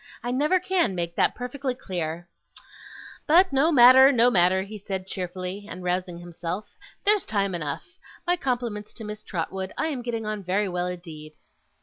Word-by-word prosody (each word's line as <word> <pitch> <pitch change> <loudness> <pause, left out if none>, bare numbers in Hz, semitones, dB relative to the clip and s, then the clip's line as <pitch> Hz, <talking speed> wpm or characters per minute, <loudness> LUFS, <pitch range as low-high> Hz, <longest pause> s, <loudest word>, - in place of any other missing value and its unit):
I 245 - -2
never 300 +8 +2
can 360 - 0
make 170 -1 -3
that - - +2
perfectly 255 +1 -4
clear. 175 -6 -5 1.0
But 350 +2 +5
no 285 +5 +3
matter, 260 0 +8
no 245 -1 +4
matter!' 185 -1 +3
he 210 +2 -9
said 190 -1 -4
cheerfully, 185 +2 -5
and 185 - -8
rousing 180 -1 -2
himself, 175 +3 -6 0.3
'there's 415 -2 +5
time 200 -3 -1
enough! 150 -5 -4 0.4
My 355 0 +2
compliments 240 -9 -3
to 225 - -7
Miss 210 0 -7
Trotwood, 190 0 -4
I 320 - 0
am 270 -5 -3
getting 230 -2 -4
on 215 -1 -3
very 195 +3 0
well 180 -1 -2
indeed. 160 -4 -8
205 Hz, 165 wpm, -25 LUFS, 180-250 Hz, 1.0 s, matter